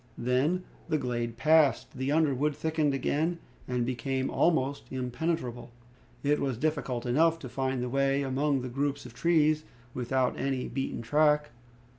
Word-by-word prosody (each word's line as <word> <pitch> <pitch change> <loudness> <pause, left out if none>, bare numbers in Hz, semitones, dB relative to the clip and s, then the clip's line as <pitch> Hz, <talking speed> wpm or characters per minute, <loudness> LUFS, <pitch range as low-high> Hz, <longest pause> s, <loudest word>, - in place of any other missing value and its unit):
Then, 135 +9 +1 0.3
the 155 - +2
glade 120 -3 -3
passed, 155 +3 +3
the 130 +2 -1
underwood 150 -2 +2
thickened 155 -1 0
again, 155 +5 0 0.3
and 125 -1 0
became 130 +2 -2
almost 145 -4 +1
impenetrable. 125 -1 -3 0.5
It 145 +1 +2
was 135 -4 -1
difficult 135 -4 -1
enough 160 +7 +3
to 140 - -8
find 130 -1 -1
the - - -2
way 135 +2 +1
among 135 +1 0
the 130 - -4
groups 140 +2 -2
of 125 - -10
trees, 155 0 +2 0.3
without 130 +1 0
any 135 -1 -1
beaten 135 -3 -3
track. 150 +2 +3
135 Hz, 145 wpm, -29 LUFS, 125-150 Hz, 0.5 s, passed